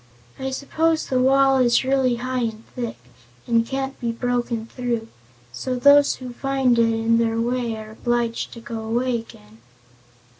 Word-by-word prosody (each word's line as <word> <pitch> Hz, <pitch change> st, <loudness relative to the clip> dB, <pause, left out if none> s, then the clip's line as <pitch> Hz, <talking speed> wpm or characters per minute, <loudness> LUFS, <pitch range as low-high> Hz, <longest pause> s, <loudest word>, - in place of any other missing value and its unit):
I 265 Hz, 0 st, -2 dB
suppose 315 Hz, +4 st, 0 dB
the 255 Hz, -, 0 dB
wall 270 Hz, +1 st, +4 dB
is 240 Hz, -1 st, +3 dB
really 260 Hz, -2 st, +2 dB
high 255 Hz, +2 st, -3 dB
and 220 Hz, 0 st, -5 dB
thick, 240 Hz, -, -4 dB, 0.5 s
and 230 Hz, -1 st, +2 dB
can't 270 Hz, +1 st, -3 dB
be 235 Hz, -2 st, -1 dB
broken 240 Hz, -1 st, -2 dB
through, 235 Hz, -2 st, -3 dB, 0.4 s
so 255 Hz, -, -3 dB
those 285 Hz, +3 st, +5 dB
who 250 Hz, -2 st, -8 dB
find 265 Hz, -2 st, +1 dB
it 230 Hz, 0 st, +4 dB
in 225 Hz, +1 st, +2 dB
their 225 Hz, 0 st, +1 dB
way 240 Hz, -1 st, -1 dB
are 215 Hz, 0 st, -9 dB
obliged 235 Hz, 0 st, -1 dB
to 230 Hz, -, -10 dB
go 230 Hz, 0 st, -6 dB
away 240 Hz, +2 st, 0 dB
again." 110 Hz, -, -15 dB
240 Hz, 160 wpm, -22 LUFS, 230-265 Hz, 0.5 s, those